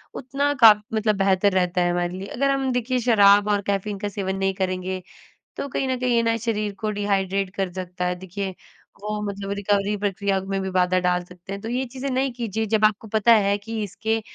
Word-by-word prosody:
उतना 280 +2 -1
का 225 - +12 0.2
मतलब 215 -1 +1
बेहतर 195 +1 +3
रहता 180 -1 +1
है 175 0 +2
हमारे 175 0 -1
लिए। 195 +1 -6
अगर 275 +6 0
हम 270 -1 0
देखिए, 250 +1 0
शराब 205 -4 +5
और 205 -1 +2
कैफीन 200 +1 -1
का 205 - -2
सेवन 190 -1 -3
नहीं 195 0 0
करेंगे 185 -1 -3 0.6
तो - - -3
कहीं 270 - -2
न 260 -1 0
कहीं 250 -1 +1
ये 230 - +4
ना 230 0 +2
शरीर 215 -2 -2
को 215 -1 -1
डिहाइड्रेट 195 -2 0
कर 195 -2 -2
सकता 180 -1 -4
है 180 0 0
देखिए, 190 +2 -5 0.5
वो 210 0 -3
मतलब 200 -1 -4
रिकवरी 200 0 +1
प्रक्रिया 200 -1 -1
में 195 0 -3
भी 190 - -3
बाधा 185 0 +2
डाल 180 0 +1
सकते 180 +1 -13
हैं 200 - -6
तो 225 - -5
ये 255 +2 -1
चीज़ें 260 +2 -5
नहीं 265 +1 0
कीजिए 220 -2 -2
जब 215 0 +2
आपको 215 +1 0
पता 220 +2 +4
है 200 -2 +3
कि 220 +2 -5
इसके 220 +3 -2
205 Hz, 215 wpm, -23 LUFS, 190-225 Hz, 0.6 s, का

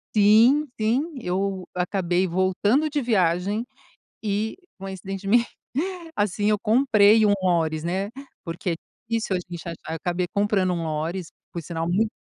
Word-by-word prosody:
Sim, 225 +8 +6
sim. 255 +10 +1
Eu 190 +1 -2
acabei 180 0 0
voltando 190 - +1
de 295 -1 -1
viagem 200 0 +1 0.6
e, 215 +1 -1 0.2
coincidentemente 195 +4 0 0.7
assim, 205 0 +1
eu 210 - +2
comprei 215 -2 +5
um 205 - +4
lóris, 165 -3 +1
né. 190 +4 -1 0.3
Porque 170 +2 -3
é - - 0 0.3
difícil 225 -4 0
a 180 - -2
gente 175 -1 -8
achar 165 -1 -6
acabei 175 +2 -1
comprando 200 -2 +2
um 170 -2 -2
lóris, 160 +3 -3 0.2
por 170 - -4
sinal 165 0 -3
muit 210 +5 +2
195 Hz, 135 wpm, -24 LUFS, 175-215 Hz, 0.7 s, Sim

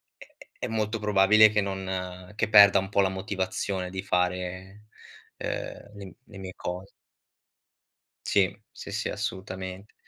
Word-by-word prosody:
è - - -14 0.3
è - - -2
è - - -3
molto 110 0 -1
probabile 105 +1 +6
che 105 0 +1
non 95 -2 -5
che 115 +1 0
perda 100 -2 +8
un 95 0 -5
po' 100 - +3
la 95 - +2
motivazione 95 -1 -3
di 95 +1 -4
fare, 90 +3 -2 0.5
ehm, - - -5
le 100 -1 -9
m 95 - -11
le 105 -6 -13
mie 95 -1 -7
cos 90 +2 -6 1.4
Sì, 100 0 +2
sì, - - -9
sì, 105 +3 -2
assolutament 95 -1 -6
95 Hz, 150 wpm, -27 LUFS, 95-105 Hz, 1.4 s, perda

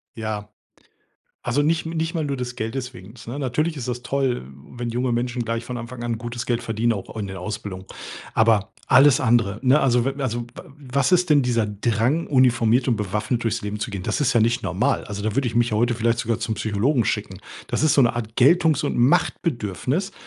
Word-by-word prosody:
Ja. 105 -2 -4 0.9
Also, 125 +4 +1
nicht 160 +1 +1
m 165 - -4
nicht 165 +1 -1
mal 160 -2 -1
nur 140 -1 -2
des 125 -1 -4
Geldes 125 +3 -4
wegens, 110 +2 -13
ne? 125 +5 -5
Natürlich 150 +5 -1
ist 125 - -5
das 125 0 -3
toll, 130 - -1 0.3
wenn 120 -1 -4
junge 125 +1 -1
Menschen 120 +1 -1
gleich 115 +1 -3
von 125 0 -5
Anfang 120 +1 -7
an 115 -2 -2
gutes 120 0 -5
Geld 120 -1 -1
verdienen, 115 +1 0
auch 100 +1 -7
in 100 -3 -3
der 95 -1 -7
Ausbildung. 100 -1 -6 0.5
Aber, 110 -2 +3 0.2
alles 135 0 +6
andere, 110 -4 +2
ne, 130 +3 +4
also, 125 -2 +3
w 135 +1 -2
also, 120 -2 -1
w - - -7 0.2
was 140 +1 -2
ist 180 -2 +3
denn 145 -1 +6
dieser 120 -3 +1
Drang, 115 +9 0
uniformiert 125 -2 +3
und 115 - +2
bewaffnet 105 +4 -2
durchs 115 0 -1
Leben 105 +1 -4
zu - - -3
gehen? 100 -2 -5
Das - - -2
ist 135 -2 +2
ja 115 - +4
nicht 115 +2 +2
normal. 100 +10 0
Also, 100 -1 -6
da 110 0 -1
würde 135 -3 +1
ich 115 - -7
mich 120 0 +2
ja 105 - 0
heute 120 +1 +2
vielleicht 115 +1 +1
sogar 115 -2 -1
zum 110 - -3
Psychologen 110 +3 +1
schicken. 100 -4 -2 0.3
Das - - -1
ist 155 -2 +4
so 140 - +5
'ne 120 -1 +2
Art 115 -1 -5
Geltungs 160 +4 +4
und - - -1
Machtbedürfnis, 135 - 0
120 Hz, 220 wpm, -23 LUFS, 110-135 Hz, 0.9 s, alles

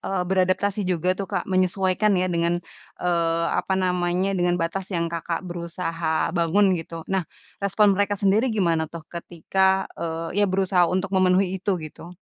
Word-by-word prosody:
eee, 190 -2 -2
beradaptasi 190 +2 +1
juga 180 +1 +1
tuh 195 +1 -5
Kak, - - -2
menyesuaikan 190 +2 +1
ya 180 0 0
dengan, 170 +1 +1 0.4
eee, 170 -1 +1 0.2
apa 190 - -1
namanya, 180 +1 0
dengan 175 -1 +1
batas 180 +3 -3
yang 170 -3 -2
Kakak 170 +2 -3
berusaha 170 -2 -2
bangun 185 +3 +3
gitu. 165 0 -8
Nah, 190 - +1 0.4
respon 200 +1 +3
mereka 205 +1 0
sendiri 205 +6 +2
gimana 170 -7 +1
tuh 165 -1 -9
ketika, 190 +3 0 0.2
eee, 165 +4 -2
ya - - +5
berusaha 185 -2 +2
untuk 190 +1 -1
memenuhi 185 0 +2
itu 195 -1 0
gitu? 170 +2 -10
180 Hz, 155 wpm, -24 LUFS, 170-190 Hz, 0.4 s, ya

